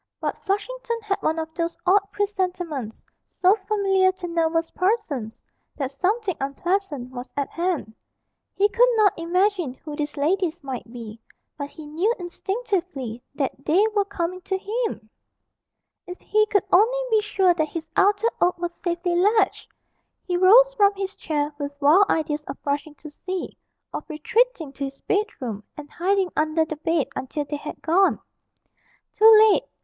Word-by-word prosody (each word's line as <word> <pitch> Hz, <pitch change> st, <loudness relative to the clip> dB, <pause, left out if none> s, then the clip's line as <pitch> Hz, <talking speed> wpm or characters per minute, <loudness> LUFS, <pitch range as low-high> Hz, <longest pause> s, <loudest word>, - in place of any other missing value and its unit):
But -, -, -4 dB
Flushington 465 Hz, +4 st, -2 dB
had 400 Hz, -2 st, -2 dB
one 320 Hz, +1 st, 0 dB
of 320 Hz, 0 st, -4 dB
those 335 Hz, 0 st, -3 dB
odd 390 Hz, +3 st, +5 dB
presentiments, 360 Hz, -, -3 dB, 0.2 s
so 370 Hz, +1 st, +3 dB
familiar 390 Hz, -3 st, +3 dB
to 365 Hz, -1 st, -7 dB
nervous 330 Hz, -1 st, 0 dB
persons, 365 Hz, -, -1 dB, 0.3 s
that 270 Hz, -2 st, -2 dB
something 380 Hz, -, 0 dB
unpleasant 290 Hz, -2 st, -2 dB
was 250 Hz, 0 st, -7 dB
at 280 Hz, -, -1 dB
hand; 340 Hz, -10 st, -2 dB, 0.6 s
he 405 Hz, -, +4 dB
could 480 Hz, +4 st, +4 dB
not 425 Hz, -3 st, +4 dB
imagine 350 Hz, -3 st, 0 dB
who 300 Hz, +2 st, -8 dB
these 295 Hz, 0 st, -4 dB
ladies 335 Hz, +2 st, 0 dB
might 255 Hz, -4 st, -6 dB
be, 230 Hz, -2 st, -9 dB, 0.3 s
but 285 Hz, -1 st, -5 dB
he 310 Hz, 0 st, -11 dB
knew 330 Hz, +9 st, 0 dB
instinctively 355 Hz, -, -3 dB
that 275 Hz, -1 st, -3 dB
they 355 Hz, +9 st, +3 dB
were 410 Hz, -, +4 dB
coming 365 Hz, -2 st, -3 dB
to 385 Hz, +1 st, -2 dB
him! 425 Hz, -, -3 dB, 1.0 s
If 360 Hz, 0 st, -8 dB
he 430 Hz, 0 st, +2 dB
could 405 Hz, -2 st, +1 dB
only 450 Hz, +7 st, +4 dB
be 435 Hz, -1 st, +4 dB
sure 385 Hz, -3 st, +2 dB
that 315 Hz, -3 st, 0 dB
his 330 Hz, 0 st, -5 dB
outer 410 Hz, +3 st, +3 dB
oak 355 Hz, +1 st, +3 dB
was 345 Hz, 0 st, -3 dB
safely 345 Hz, 0 st, -1 dB
latched! 415 Hz, +5 st, +2 dB, 0.6 s
He 355 Hz, -, -2 dB
rose 455 Hz, +8 st, +6 dB
from 405 Hz, -4 st, +4 dB
his 390 Hz, 0 st, -4 dB
chair 300 Hz, -1 st, -2 dB
with 285 Hz, 0 st, -5 dB
wild 325 Hz, +8 st, +5 dB
ideas 305 Hz, -1 st, 0 dB
of -, -, -6 dB
rushing 290 Hz, +1 st, -2 dB
to 305 Hz, -, -11 dB
see, 370 Hz, +4 st, -5 dB, 0.4 s
of -, -, -6 dB
retreating 325 Hz, -, 0 dB
to 280 Hz, 0 st, -4 dB
his 275 Hz, 0 st, -8 dB
bedroom, 255 Hz, -, -2 dB
and 295 Hz, -1 st, -9 dB
hiding 380 Hz, +1 st, 0 dB
under 315 Hz, +1 st, +1 dB
the 310 Hz, -1 st, -6 dB
bed 325 Hz, -1 st, 0 dB
until 290 Hz, +3 st, -3 dB
they 295 Hz, +1 st, -4 dB
had 300 Hz, +1 st, -8 dB
gone. 370 Hz, +4 st, +3 dB, 0.9 s
Too 440 Hz, +1 st, +7 dB, 0.2 s
late! -, -, +1 dB
350 Hz, 160 wpm, -24 LUFS, 295-400 Hz, 1.0 s, Too